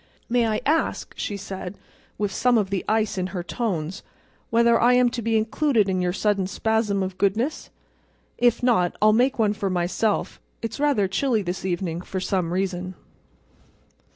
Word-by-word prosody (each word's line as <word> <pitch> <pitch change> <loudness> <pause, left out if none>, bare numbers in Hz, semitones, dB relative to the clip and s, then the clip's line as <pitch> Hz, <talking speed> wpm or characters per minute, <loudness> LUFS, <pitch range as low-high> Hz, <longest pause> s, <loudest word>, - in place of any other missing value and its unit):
"May 240 -1 +2
I 215 -1 -1
ask," 315 +3 0
she 205 - -3
said, 190 -1 -7 0.4
with 205 -1 -1
some 245 +4 +2
of 200 -3 0
the 195 - -1
ice 215 -3 +1
in 185 - -1
her 185 -1 -5
tones, 185 -5 -3 0.5
"whether 235 0 +4
I 245 +1 +5
am 250 0 +4
to 240 0 -4
be 225 0 +1
included 220 0 +1
in 185 -1 0
your 180 0 +1
sudden 200 0 0
spasm 210 -1 0
of 185 0 -5
goodness? 225 +10 0 0.7
If 240 0 +3
not, 200 -8 +2
I'll 215 0 +5
make 250 +4 +2
one 215 -3 +2
for 205 -2 -2
myself. 185 +4 -1 0.2
It's 230 - -4
rather 280 -9 +2
chilly 225 +2 0
this 180 +1 -4
evening, 175 -2 -2
for 190 +1 -5
some 185 -2 -1
reason." 185 0 -2
205 Hz, 170 wpm, -24 LUFS, 185-235 Hz, 0.7 s, I